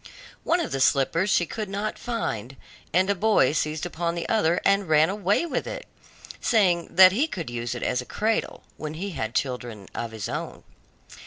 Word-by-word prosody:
One 340 +2 +2
of 335 - -3
the 135 - -2
slippers 155 +8 +2
she 175 - +3
could 215 +3 -5
not 205 +2 -3
find, 135 - -4 0.3
and 185 +3 +3
a 200 - +3
boy 200 -9 +3
seized 155 +1 -1
upon 170 -1 -2
the 170 - -3
other 175 -7 +2
and 195 -3 +2
ran 155 +3 +4
away 205 - +1
with 335 - -3
it, - - -6 0.5
saying 180 -7 +2
that 185 0 +9
he 260 +11 +1
could 170 - -5
use 120 0 -3
it 120 - -5
as 125 0 0
a - - -10
cradle, 220 - -1
when 155 0 -6
he 195 +5 -4
had 115 -7 -4
children 120 -6 -3
of 115 - -4
his 110 -2 -5
own. - - -5
170 Hz, 190 wpm, -25 LUFS, 135-200 Hz, 0.5 s, that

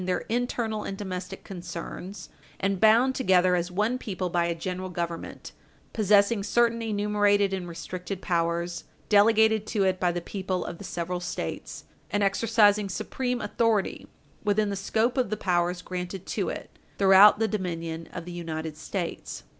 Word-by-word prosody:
448 180 0 0
their 230 - 0
internal 235 -3 -1
and 195 - -5
domestic 190 -1 -6
concerns, 175 +1 -7 0.3
and 195 -1 0
bound 230 +5 +5
together 185 -8 +3
as 175 0 -1
one 210 +7 0
people 185 -6 -4
by 170 -1 +2
a 170 0 -1
General 185 +2 -4
Government, 170 -1 -5 0.4
possessing 205 0 +3
certain 230 +3 +2
enumerated 205 -2 +2
and 185 -2 -3
restricted 180 +3 -6
powers 170 -1 -1 0.2
delegated 220 +1 +4
to 210 -3 0
it 185 -1 +1
by 180 -1 +2
the 175 - -2
people 185 0 -3
of 170 - -6
the - - -8
several 175 -1 -3
States, 175 - -5 0.3
and 205 0 0
exercising 205 0 +3
supreme 250 +5 -2
authority 225 -4 0 0.4
within 210 0 +1
the - - -2
scope 225 +6 0
of 250 - +1
the 215 - -2
powers 180 -1 0
granted 180 +1 -5
to - - -2
it - - -8 0.2
throughout 195 +2 +8
the 225 +1 +1
dominion 165 -5 -4
of 170 -2 -7
the 175 - -7
United 160 -2 -5
States. 170 +3 -5
195 Hz, 160 wpm, -27 LUFS, 175-210 Hz, 0.4 s, throughout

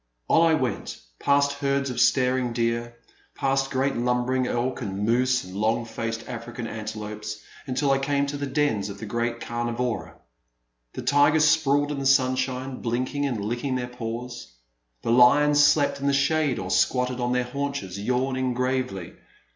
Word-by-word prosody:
On - - +5
I 160 - +4
went, 130 -8 -3 0.2
past 140 0 +3
herds 140 -1 0
of 120 0 -1
staring 125 -1 +2
deer, 115 0 -1 0.4
past 135 0 0
great 135 +1 0
lumbering 125 +1 0
elk, 125 +3 -2
and 100 -2 -3
moose, 125 +2 +2
and 90 +1 -10
long 110 +3 0
faced 115 0 -5
African 120 0 -6
antelopes, 105 -1 -6 0.2
until 135 +2 +1
I 135 - +3
came 140 +1 0
to 145 0 -4
the 140 0 -3
dens 130 -8 0
of 100 - -7
the 110 - -7
great 120 +2 -2
camivora. 120 0 -3 0.8
The - - -6
tigers 145 +2 +4
sprawled 145 -2 +2
in 145 - -3
the 135 - -4
stmshine, 130 0 +1
blinking 130 +4 -1
and 110 -6 -3
licking 120 +4 -2
their 125 -1 -2
paws; 120 - -6 0.5
the - - 0
lions 145 +5 +6
slept 145 -1 +3
in 140 - -1
the 140 - +3
shade 140 0 +2
or 95 0 -4
squatted 125 +7 +1
on 120 0 0
their 125 0 +1
haunches, 140 -7 -4
yawning 130 +3 -1
gravely. 125 -8 -2
125 Hz, 165 wpm, -25 LUFS, 115-140 Hz, 0.8 s, lions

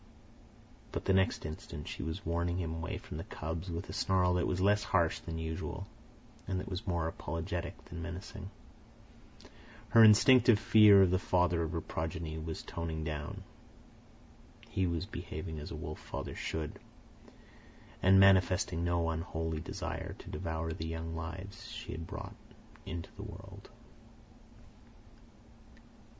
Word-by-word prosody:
But - - -4
the 95 - +3
next 95 -4 +2
instant 75 -1 -6
she - - -5
was 80 +5 -4
warning 85 +1 0
him 85 -3 -2
away 80 0 -3
from - - -8
the - - -4
cubs 80 +3 -5
with 85 +2 -4
a - - -7
snarl 90 -1 +2
that 90 -1 +1
was 90 - 0
less 105 +2 +4
harsh 85 -3 +2
than 80 -1 -6
usual 80 0 -4 0.6
and 95 -1 -1
that - - -6
was 95 +2 -5
more 85 -3 0
apologetic 85 +1 -4
than 85 - -7
menacing. 95 +4 -6 1.4
Her 115 - +8
instinctive 115 +2 +8
fear 105 -2 +8
of 90 - +3
the 95 - +3
father 90 -3 +2
of 80 -1 -1
her 85 - -1
progeny 80 0 -4
was 80 0 -5
toning 80 -1 -4
down. 75 -2 -4 1.3
He 95 -1 +1
was 85 +1 -1
behaving 80 -5 -6
as 75 - -7
a - - -5
wolf 75 0 -6
father - - -5
should, 80 -1 -4 1.2
and 95 +1 +7
manifesting 90 -3 +5
no 85 -1 +1
unholy 80 -1 -2
desire 80 - -4
to - - -11
devour 80 0 -3
the 80 -1 -4
young 80 0 -4
lives 85 +5 -6
she - - -7
had 80 +1 -5
brought - - -6 0.5
into 85 +1 -5
the - - -6
world. - - -10
85 Hz, 145 wpm, -33 LUFS, 80-95 Hz, 1.4 s, Her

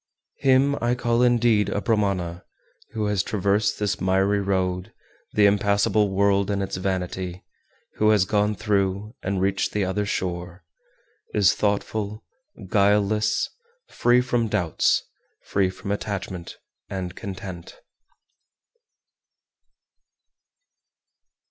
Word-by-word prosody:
414. 135 - +1
Him 135 +2 +4
I 120 +1 +2
call 120 0 +1
indeed 120 -4 +3
a - - -1
Brahmana 100 -6 -1 0.5
who 110 -1 -1
has 105 -2 +1
traversed 105 +1 0
this 105 -2 -1
miry 95 +2 +2
road, 95 -2 -1 0.4
the 105 - +4
impassable 100 +1 +3
world 100 0 +2
and 100 -1 0
its 95 - -4
vanity, 95 -1 -3 0.5
who 110 - +3
has 105 -3 +4
gone 105 +2 +1
through, 100 0 -1
and 95 0 -2
reached 95 +1 0
the 105 -2 +1
other 100 +2 -1
shore, 90 -2 -4 0.7
is 100 -3 +5
thoughtful, 105 +1 -2 0.4
guileless, 105 +2 +2 0.4
free 120 +1 +3
from 120 -2 0
doubts, 95 -7 +1 0.4
free 95 -2 +1
from 100 +2 -6
attachment, 95 -4 -4 0.3
and 90 -2 -5
content. 95 -4 -8
100 Hz, 110 wpm, -24 LUFS, 95-105 Hz, 0.7 s, is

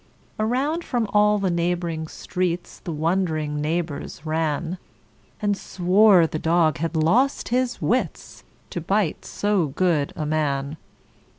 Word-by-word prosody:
Around 270 +10 0
from 240 -6 -1
all 210 0 +4
the 195 -3 0
neighboring 170 -2 -1
streets 180 +1 -3
The 170 - -6
wond'ring 155 -2 -1
neighbors 160 -1 -3
ran, 160 +2 -1 0.6
And 205 -1 +1
swore 190 0 +4
the 155 -1 -3
dog 160 -2 +2
had 165 +1 -2
lost 220 - +2
his 245 0 0
wits, 230 - -2 0.3
To 175 - -3
bite 195 0 0
so 205 -5 0
good 150 0 +1
a 155 - -3
man. 150 -1 -1
175 Hz, 125 wpm, -23 LUFS, 155-205 Hz, 0.6 s, all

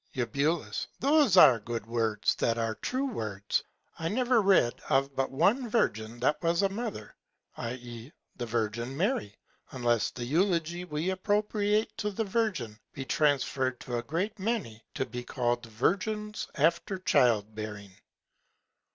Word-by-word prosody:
Eu. 140 +6 0 0.4
Those 280 - +4
are 135 -9 +8
good 115 0 -5
Words 115 -2 +1
that 115 0 +1
are 115 -1 0
true 260 - -2
Words. 110 - -2 0.4
I 165 - -1
never 245 +4 +2
read 190 -12 +4 0.2
of 135 0 +2
but 135 0 0
one 210 - +2
Virgin 115 - 0
that 145 +4 +1
was 170 +2 +2
a 195 - +3
Mother, 200 - -5 0.4
i.e. 120 +1 -6 0.2
the 120 - -5
Virgin 115 +3 -2
Mary, 175 - 0 0.3
unless 120 -4 +1
the 120 - -6
Eulogy 170 +3 0
we 160 +2 -2
appropriate 210 +2 0
to 210 -1 0
the 210 +2 -2
Virgin 190 - -1
be 135 - -6
transferr'd 135 -3 +1
to 125 - -4
a - - -3
great 180 - -3
many 190 - -2
to 130 - -1
be 125 -1 -6
call'd 120 -2 -1
Virgins 210 - -1
after 170 +5 +1
Childbearing. 110 - +1
140 Hz, 140 wpm, -29 LUFS, -, 0.4 s, are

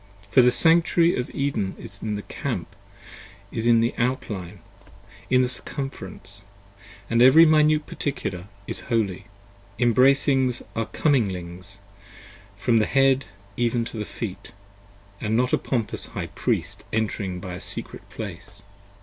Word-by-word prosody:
For 130 - +7
the 125 0 +5
Sanctuary 170 +2 +4
of 125 - -3
Eden 140 -9 -2
is 100 +2 -10
in 105 -1 -2
the 105 - -5
Camp, - - -5 0.8
in 115 0 +3
the 115 - +1
Outline, 105 -7 -2 0.7
In 130 0 +4
the - - +1
Circumference: 100 -6 -6 0.3
& 100 0 -20
every 130 +8 +7
Minute 155 -1 +4
Particular 95 -11 -4 0.2
is - - -4
Holy: 105 -5 0 0.5
Embraces 130 +1 +3
are 115 -1 -1
Cominglings, 95 - -1 0.8
from 115 +3 +3
the 110 - +2
Head 135 0 +3 0.3
even 120 0 0
to 115 - -7
the 105 - -2
Feet, 100 -4 -6 0.7
And 110 +1 0
not 125 +1 +1
a - - +4
pompous 115 -5 -2
High - - -6
Priest - - -2
entering 100 -4 -2
by 90 0 -7
a 90 - -6
Secret - - -5
Place. 100 -2 -8
115 Hz, 130 wpm, -24 LUFS, 100-130 Hz, 0.8 s, For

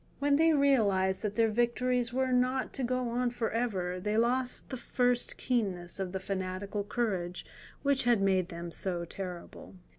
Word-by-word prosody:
When 285 0 +3
they 325 +1 +5
realized 205 -10 +3
that 210 -1 -3
their 225 -1 +3
victories 240 +1 +1
were 260 +1 0
not 255 +1 +1
to 270 - -3
go 250 0 0
on 245 +1 0
for 235 -2 -2
ever, 190 -6 -1
they 210 +3 -1
lost 250 +2 0
the 260 - -4
first 245 0 0
keenness 195 -8 -1
of 190 -2 -2
the 190 - -3
fanatical 190 +1 -3
courage 190 -5 -2 0.4
which 280 -3 +2
had 240 -3 +4
made 190 -2 +2
them 170 -1 -6
so 175 -1 -2
terrible. 180 +1 -8
225 Hz, 170 wpm, -31 LUFS, 190-250 Hz, 0.4 s, they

